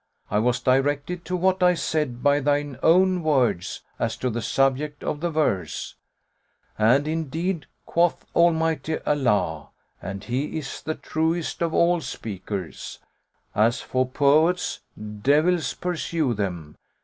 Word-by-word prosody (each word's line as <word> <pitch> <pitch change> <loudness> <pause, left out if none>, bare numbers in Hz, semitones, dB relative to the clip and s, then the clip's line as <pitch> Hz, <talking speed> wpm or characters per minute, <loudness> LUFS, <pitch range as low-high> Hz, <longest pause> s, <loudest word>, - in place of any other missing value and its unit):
I 105 - +2
was 125 +2 +1
directed 145 +6 0
to 180 - -2
what 185 +1 +1
I 180 0 +5
said 150 -7 -2
by 145 0 +4
thine 145 -2 0
own 185 +2 +4
words 130 - 0 0.2
as - - -1
to 125 - -1
the 120 +1 -3
subject 135 +4 0
of 150 - -2
the 175 +2 -1
verse; 150 - -1 0.8
and 125 +7 +3
indeed 160 +2 -2 0.2
quoth 170 0 +1
Almighty 160 -2 +2
Allah 115 - +1 0.3
(and 95 +2 -6
He 130 +7 -2
is 150 -3 -6
the 155 - -3
truest 160 +2 -2
of 165 -1 0
all 175 0 +3
speakers): 100 - -6 0.6
As 115 +3 +2
for 130 0 0
poets 155 +7 +2 0.4
(devils 155 +5 +2
pursue 165 -6 -1
them!) 90 -8 -4
145 Hz, 130 wpm, -24 LUFS, 125-165 Hz, 0.8 s, I